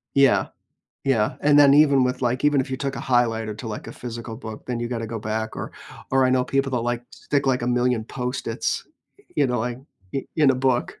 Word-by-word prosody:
Yeah, 140 -1 +4 0.6
yeah, 115 -6 +1
and 145 0 +5
then 140 -1 +7
even 140 -3 +5
with, 125 +1 -2
like, 125 +2 0
even 145 -2 +4
if 130 - -4
you 130 - -1
took 135 0 -3
a - - -4
highlighter 115 -4 +1
to, 115 - -7
like, 105 - -6
a - - -7
physical 115 -1 -7
book, 110 -3 -8
then 125 -2 -2
you 120 - -2
gotta 115 -2 -3
go 115 0 -4
back 110 +1 -3
or - - -5 0.4
or 135 0 +4
I 130 - +3
know 130 -1 +3
people 135 +1 0
that, 125 - +1
like, 120 0 -2
stick, 140 -2 -2
like, 125 -2 +2
a - - -1
million 125 -2 +1
Post-its, 125 +2 -3 0.5
you 145 -2 +4
know, 125 -1 -1
like, 120 +2 -2 0.3
in 135 - -3
in 150 -4 +5
a 130 - +2
book. 130 -1 0
125 Hz, 230 wpm, -23 LUFS, 115-135 Hz, 0.6 s, then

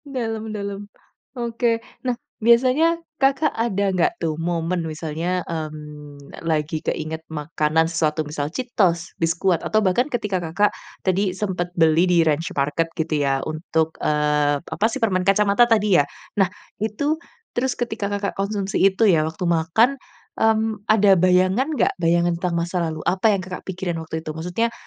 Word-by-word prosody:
Dalam 225 -3 -3
dalam. 200 -1 -5 0.5
Oke, 235 0 0 0.2
nah 250 -2 -1 0.2
biasanya 255 +9 +4 0.2
Kakak 275 +3 +3
ada 200 -4 0
nggak 180 -3 +1
tuh 165 -2 -1
momen 170 +1 -1
misalnya, 165 +3 -3
mmm, 150 -3 -8
lagi 155 -1 -1
keinget 160 +1 -3
makanan 155 +1 0
sesuatu, 155 -1 0
misal 150 0 -3
Cheetos, 180 -6 0
Biskuat, 170 +1 +1
atau 215 - 0
bahkan 245 +10 +2
ketika 210 -7 -1
Kakak 175 +5 +1 0.3
tadi 190 0 +1
sempet 185 -4 -2
beli 165 +2 +4
di 170 -2 +4
Ranch 160 +4 +1
Market 150 +4 0
gitu, 160 0 -1
ya. 135 -1 0
Untuk, 160 0 -1
eee, 150 -1 +2
apa 195 +7 -3
sih, 250 - -3
permen 200 -7 +1
kacamata 200 +4 +4
tadi 210 -7 +4
ya. - - 0 0.4
Nah 185 - +3 0.3
itu, 285 +10 -1 0.3
terus 255 +1 -1
ketika 220 -4 -2
Kakak 200 0 -2
konsumsi 200 0 -2
itu 195 +4 +1
ya, 170 -7 +5
waktu 160 +3 -3
makan, 180 +11 +2 0.4
mmm, 220 -1 +2
ada 210 -2 +6
bayangan 185 - +3
nggak? - - +2
Bayangan 170 +1 +3
tentang 175 -2 0
masa 170 +1 -1
lalu, 155 -1 -6
apa 190 +4 +2
yang 185 - -6
Kakak 185 0 -8
pikiran 180 -3 -3
waktu 160 0 -6
itu? 155 - -4
Maksudnya, 180 +9 -2
180 Hz, 155 wpm, -22 LUFS, 160-215 Hz, 0.5 s, ada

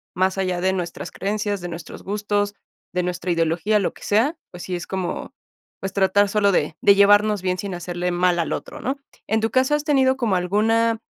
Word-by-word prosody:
más 185 +2 +1
allá 185 -2 0
de 190 0 +2
nuestras 175 -2 -4
creencias, 205 -1 -2
de 175 - -4
nuestros 165 -1 -8
gustos, 205 0 -1 0.4
de 180 0 0
nuestra 180 0 -3
ideología, 170 +5 +1
lo 195 - 0
que - - -18
sea, 235 +11 +2 0.2
pues 180 -1 -9
sí 185 - -5
es 175 - -6
como, 190 -2 -4 0.5
pues, 195 0 -4
tratar 200 +1 +3
solo 200 -1 +3
de 155 -4 0
de 200 - +6
llevarnos 205 0 +5
bien 185 0 0
sin 195 -3 -4
hacerle 175 0 -3
mal 175 0 +2
al 165 - -1
otro, - - -6
¿no? 270 +3 -2 0.3
En 220 +1 +1
tu 225 - 0
caso, 260 +3 +3
¿has 295 - -2
tenido 265 -3 +3
como 225 -7 +1
alguna, 220 +5 +2
195 Hz, 205 wpm, -22 LUFS, 180-215 Hz, 0.5 s, de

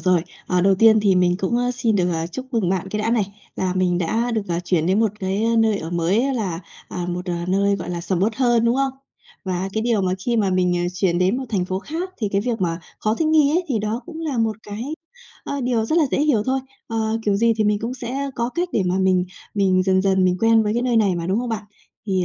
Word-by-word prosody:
rồi. 185 -3 +2 0.2
Ờ, 180 -1 +1
đầu 195 +1 +4
tiên 220 +2 +6
thì 200 -2 +3
mình 180 -1 +3
cũng, 195 +5 0
ơ, 245 0 +1
xin 230 -4 +1
được, 180 -1 +1
à, 165 0 -2
chúc 260 +10 -7
mừng 220 -6 +1
bạn 190 0 -1
cái 210 +2 -2
đã 225 - 0
này, 225 -4 +2 0.3
là 185 -1 -1
mình 180 -1 +1
đã 225 +8 0
được, 220 -3 0
à, 170 0 -1
chuyển 175 -2 0
đến 190 +4 +2
một 220 -3 +2
cái 210 +5 0
nơi 220 -2 +3
ở 160 - -6
mới 195 +11 +1
là, 185 -7 -2 0.3
à, 180 -1 -4
một 180 +1 -4 0.2
nơi, 200 +1 +2
gọi 180 - -6
là, 175 - -3
sầm 180 0 -1
uất 215 +2 0
hơn, 240 -3 +3
đúng 235 +1 +3
không? 270 -1 +1 0.5
Và 185 0 -2
cái 220 - -1
điều 230 -4 +1
mà 185 0 +1
khi 235 - +1
mà 205 -4 +2
mình, 185 -1 +2
ờ, 175 - 0
chuyển 180 -2 +1
đến 185 +5 +2
một 265 - -3
thành 195 -5 0
phố 185 +1 -2
khác 335 - -5
thì 215 - -1
cái 200 - +2
việc 230 -2 -2
mà 170 -1 -1 0.2
khó 215 0 0
thích 320 +6 0
nghi 310 -2 +4
ấy 350 +4 +1
thì 250 -6 +1
đó 215 +3 -2
cũng 330 -1 -8
là 290 -7 -2
một 220 -2 +1
cái, 205 +2 -6 0.6
ờ, 280 -1 -3
điều 240 -3 0
rất 315 +8 +1
là 315 - +4
dễ - - +1
hiểu 290 -9 +2
thôi. 265 +1 +1 0.3
Ờ, 225 -1 -1
kiểu 205 -1 +2
gì 230 +2 +3
thì 215 - +1
mình 210 0 +2
cũng 230 +4 -4
sẽ, 250 +1 -5
ơ, 275 - -4
có 235 0 -1
cách 350 +1 0
để 205 - +2
mà 180 +1 +1
mình 185 -1 +3 0.3
mình 190 -2 +3
dần 190 0 +2
dần 190 -1 +3
mình 180 -1 +2
quen 225 0 +5
với 210 - 0
cái 240 - 0
nơi 245 -2 +1
này 205 -4 +3
mà, 170 -1 -3
đúng 195 +4 +1
không 245 0 -2
bạn? 220 -2 -2 0.4
Thì, 185 -2 +1
210 Hz, 275 wpm, -21 LUFS, 185-235 Hz, 0.6 s, tiên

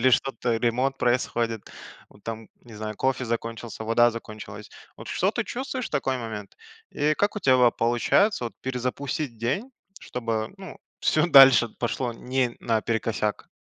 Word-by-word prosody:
или 130 - +5
что-то, 120 -2 +1
ремонт 125 +4 0
происходит, 120 -3 0 0.4
ну - - -19
там, 115 0 -6
не 120 - -15
знаю, 110 0 -5
кофе 130 +1 0
закончился, 115 0 -4
вода 120 +2 +4
закончилась. 110 -2 -9 0.3
Вот - - -10
что 190 +3 +1
ты 235 0 -2
чувствуешь 260 +1 -4
в - - -34
такой 135 -3 0
момент 110 -4 -7 0.3
и 150 +1 +1
как 205 +5 0
у - - +1
тебя 130 -9 +4
вот 125 -2 +4
получается 120 - +2
вот 115 - -5
перезапустить 130 +1 -3
день, 135 - -2 0.3
чтобы, 115 -2 -3
ну 190 -1 -10 0.2
всё 155 +2 +3
дальше 135 -4 +8
пошло 120 0 -1
не 125 0 -1
наперекосяк? 110 -1 -1
120 Hz, 155 wpm, -25 LUFS, 115-135 Hz, 0.4 s, дальше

